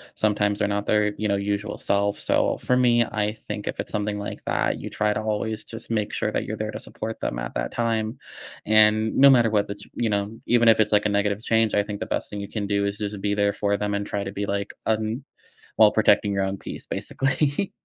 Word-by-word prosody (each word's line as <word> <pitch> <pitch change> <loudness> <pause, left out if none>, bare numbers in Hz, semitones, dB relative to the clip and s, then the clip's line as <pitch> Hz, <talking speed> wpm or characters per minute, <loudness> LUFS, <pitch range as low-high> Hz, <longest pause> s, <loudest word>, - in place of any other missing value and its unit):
sometimes 105 -1 +1
they're 105 - +2
not 100 0 -1
their, 105 -1 +2
you 105 - -1
know, 100 - +1
usual 100 +1 -2
self, 100 0 0
so - - +1
for 125 - +1
me, 120 -2 +4
I 105 0 -1
think 105 -2 -7
if - - -4
it's - - -7
something 105 0 -2
like 100 - -5
that, - - 0
you - - -6
try 105 0 0
to 110 - -2
always 110 0 -2
just 115 0 -9
make 105 -2 -1
sure - - -1
that - - -1
you're - - -4
there - - -3
to - - -6
support 110 +1 -6
them - - -3
at - - -5
that - - -2
time, 115 +1 -1 0.5
and 110 0 +4
no 140 +1 +8
matter 120 -4 +5
what 105 -1 +1
the 100 - -5
ch 100 - -13
you 115 -2 0
know, 100 +2 -2
even 120 -1 +4
if 110 - +5
it's, 110 - +2
like, 105 0 +4
a - - +2
negative 100 +1 0
change, 115 -1 +2
I 100 - +3
think 105 -1 -6
the - - -3
best - - -3
thing 105 - -6
you 100 - -5
can 105 -3 -3
do 100 0 +1
is 100 0 -2
just 105 -1 -4
be 105 0 0
there 100 0 +2
for 100 -1 0
them 105 0 -2
and 100 0 -1
try 100 -1 -2
to 95 - -5
be, 100 0 -3
like, 100 0 -3
un 110 +4 -1 0.5
while - - +6
protecting 100 - +3
your 100 - 0
own 95 0 -3
peace, - - -8
basically. 140 +7 -1
105 Hz, 250 wpm, -24 LUFS, 100-110 Hz, 0.5 s, no